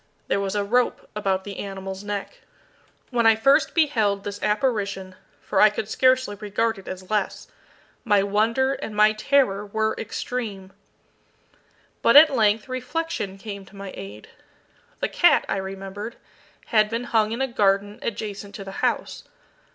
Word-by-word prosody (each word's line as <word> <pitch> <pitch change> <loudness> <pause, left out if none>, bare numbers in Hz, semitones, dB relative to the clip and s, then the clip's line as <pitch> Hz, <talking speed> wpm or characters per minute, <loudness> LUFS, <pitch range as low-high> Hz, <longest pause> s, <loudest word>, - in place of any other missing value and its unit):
There - - +2
was 195 0 -2
a 205 - +1
rope 245 +5 0
about 195 -2 0
the 200 -1 -7
animal's 195 0 -6
neck. 205 -1 -5 0.7
When 235 -2 +3
I 225 - +7
first 275 +7 +3
beheld 220 -11 +2
this 205 0 -6
apparition 205 -4 -1 0.3
for - - +1
I 215 - +8
could 210 0 -4
scarcely 255 -1 +2
regard 220 +1 -1
it 190 - -15
as 185 +1 -8
less 210 -2 -1 0.6
my 205 -2 +3
wonder 225 +7 +1
and 220 -5 -6
my 215 +1 +5
terror 215 -3 +2
were 220 +1 -1
extreme. 215 -4 -5 1.3
But 230 - +4
at 300 -1 +8
length 215 -1 +2
reflection 255 -5 -3
came 200 -1 -7
to 200 - -18
my 195 -1 -8
aid. 100 +2 -10 0.7
The - - +1
cat, - - +4
I - - -1
remembered, 195 +3 -6 0.6
had 215 -1 +4
been 230 +2 -2
hung 220 -3 +1
in 230 - -3
a 265 - +1
garden 205 -2 +1
adjacent 205 -3 -5
to 200 - -7
the 195 - -8
house. - - -1
210 Hz, 155 wpm, -24 LUFS, 195-230 Hz, 1.3 s, I